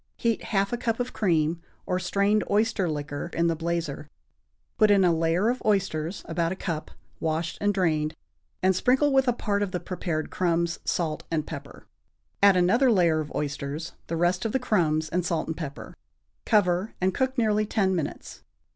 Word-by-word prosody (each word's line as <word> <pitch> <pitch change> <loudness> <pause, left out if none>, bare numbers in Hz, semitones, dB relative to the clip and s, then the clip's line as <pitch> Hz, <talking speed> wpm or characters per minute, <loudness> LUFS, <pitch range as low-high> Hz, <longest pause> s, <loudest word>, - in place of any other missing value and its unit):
Heat 230 -2 -1
half 200 +1 0
a - - 0
cup 230 -1 -1
of 245 0 -3
cream 170 -4 +1 0.2
or 180 0 0
strained 200 +3 +1
oyster 210 -3 +1
liquor 145 +1 -4
in 170 - +2
the 165 -1 +2
blazer, 165 -3 -3 0.7
put 215 -1 +6
in 200 -2 +5
a 175 - +4
layer 165 +5 +1
of 250 +1 -1
oysters 190 -4 0
(about 170 -1 -1
a - - -2
cup), 165 -4 -4 0.3
washed 160 +1 -2
and 205 0 +3
drained, 160 -5 0 0.5
and 190 0 +4
sprinkle 265 +8 +3
with 265 -1 +4
a - - +5
part 205 -4 -1
of 205 - 0
the 180 - -2
prepared 170 -4 -3
crumbs, 170 -1 0
salt 160 -3 -1
and 155 -2 -1
pepper; - - -9 0.6
add 200 -2 +6
another 235 +9 +4
layer 170 -6 +3
of 150 -1 -4
oysters, 145 +2 -3
the 165 - -2
rest 175 +2 +1
of 225 - -2
the - - +3
crumbs, 160 -10 +1
and 175 +3 -1
salt 170 -1 -1
and 160 - -4
pepper. 145 -4 -7 0.5
Cover, 195 -1 +2
and 185 0 +1
cook 260 0 -1
nearly 215 -2 +2
ten 190 -3 +1
minutes. 165 -4 -5
180 Hz, 180 wpm, -26 LUFS, 165-205 Hz, 0.7 s, put